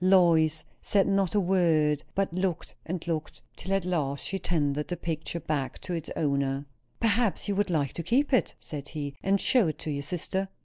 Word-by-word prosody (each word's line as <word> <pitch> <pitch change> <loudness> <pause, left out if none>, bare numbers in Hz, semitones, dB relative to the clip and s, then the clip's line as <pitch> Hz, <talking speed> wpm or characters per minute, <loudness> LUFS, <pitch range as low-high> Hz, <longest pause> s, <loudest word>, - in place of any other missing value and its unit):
Lois 165 -4 +5 0.2
said 200 -2 +3
not 195 -1 +2
one 200 -3 +3
word, 155 -5 +3
but 195 -3 0
looked 185 -2 -2
and 170 0 -3
looked, 160 -2 -3
till 190 - -6
at 195 -2 +1
last 145 -6 -1
she 195 - -2
tendered 150 -4 0
the 175 - -3
picture 165 +1 -3
back 145 -4 -2
to 180 - -5
its 165 -2 -3
owner. 140 -2 0 0.3
"Perhaps 225 -2 +1
you 205 - +1
would 205 0 +1
like 145 -6 0
to - - -3
keep 270 - +1
it," 255 - +2
said 145 -2 -7
he, 145 -3 -4
"and 195 +1 +2
show 240 -4 +4
it 155 -1 -2
to 155 - -4
your 140 -1 -2
sister." 180 +5 -2
170 Hz, 195 wpm, -28 LUFS, 150-195 Hz, 0.3 s, Lois